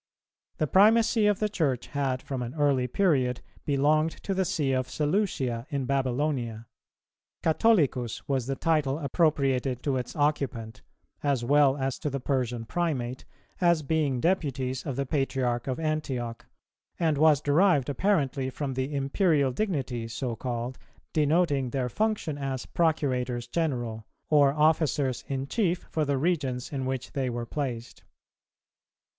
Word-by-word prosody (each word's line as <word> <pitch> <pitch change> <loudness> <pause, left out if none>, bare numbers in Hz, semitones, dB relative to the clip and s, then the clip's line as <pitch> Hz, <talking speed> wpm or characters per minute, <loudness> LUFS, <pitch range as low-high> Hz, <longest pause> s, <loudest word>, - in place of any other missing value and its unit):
The 155 - +1
primacy 220 - +4
of 205 -2 +3
the 215 - 0
Church 155 - -1
had 135 -3 -1
from 135 -2 -4
an 120 +3 -5
early 140 -4 +2
period 130 -6 +1 0.3
belonged 150 +3 +3
to 195 - -1
the 190 0 +1
See 145 -4 0
of 130 -1 0
Seleucia 145 - -1
in 140 -2 -2
Babylonia. 130 -3 -1 0.8
Catholicus 155 - +2
was 135 -4 -1
the 135 - -1
title 150 -3 +1
appropriated 140 -4 +1
to 140 -3 0
its 125 -1 -5
occupant, 135 -7 -1 0.4
as 140 -5 0
well 145 +1 +4
as 135 -1 -2
to 150 - -2
the 140 0 -3
Persian 125 -3 -1
Primate, 130 -6 -2 0.4
as 170 -3 +3
being 145 -3 0
deputies 135 -6 -1
of 135 - -2
the 140 +1 -1
Patriarch 130 -3 -1
of 130 +2 -2
Antioch, 135 -7 -3 0.5
and 160 -3 +2
was 155 -2 +5
derived 150 -1 +3
apparently 140 -4 0
from 135 0 -4
the 130 +3 -2
Imperial 140 0 +2
dignity 130 - -2
so 115 +1 -3
called, 120 +2 -4 0.3
denoting 150 -3 +2
their 125 -1 -1
function 205 - -1
as 135 -2 -3
Procurators 130 -7 0
general, 120 -8 -2 0.2
or 145 -2 +6
officers 150 -3 +1
in 135 -1 -2
chief 180 +1 0
for 155 -1 0
the 140 -1 0
regions 135 -5 -1
in 135 -2 -2
which 130 -2 -3
they 135 -3 -1
were 120 0 -3
placed. 125 -3 -5
140 Hz, 140 wpm, -27 LUFS, 125-155 Hz, 0.8 s, or